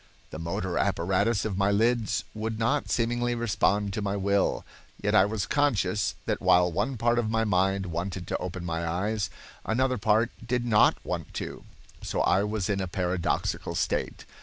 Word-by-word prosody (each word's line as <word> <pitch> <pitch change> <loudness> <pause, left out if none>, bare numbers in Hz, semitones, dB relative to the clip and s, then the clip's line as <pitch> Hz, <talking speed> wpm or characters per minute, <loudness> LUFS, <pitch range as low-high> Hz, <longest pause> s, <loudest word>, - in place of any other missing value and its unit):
The 80 - -6
motor 90 +2 -2
apparatus 100 +6 +1
of 100 -3 -2
my 100 0 +3
lids 110 +1 +1
would 110 0 -3
not 125 +6 0
seemingly 120 +1 0
respond 105 -3 +1
to 110 - -2
my 100 -1 -1
will, 100 0 +1 0.3
yet - - -1
I 95 - +6
was 105 -1 -2
conscious 105 -9 +1
that - - -1
while 90 0 +4
one 105 +9 -1
part 120 +2 +2
of 110 -2 -1
my 110 0 +1
mind 95 -1 +1
wanted 90 +2 -4
to - - -2
open 90 0 -5
my 85 0 -2
eyes, 95 +4 -1 0.3
another 130 +1 0
part 110 +2 +2
did 120 +1 -1
not 105 -3 +4
want - - -4
to, - - -6 0.4
so - - -2
I 95 - +3
was 105 -2 -2
in 100 -2 0
a 95 - -2
paradoxical 90 -1 -1
state. - - -2
105 Hz, 175 wpm, -27 LUFS, 95-115 Hz, 0.4 s, I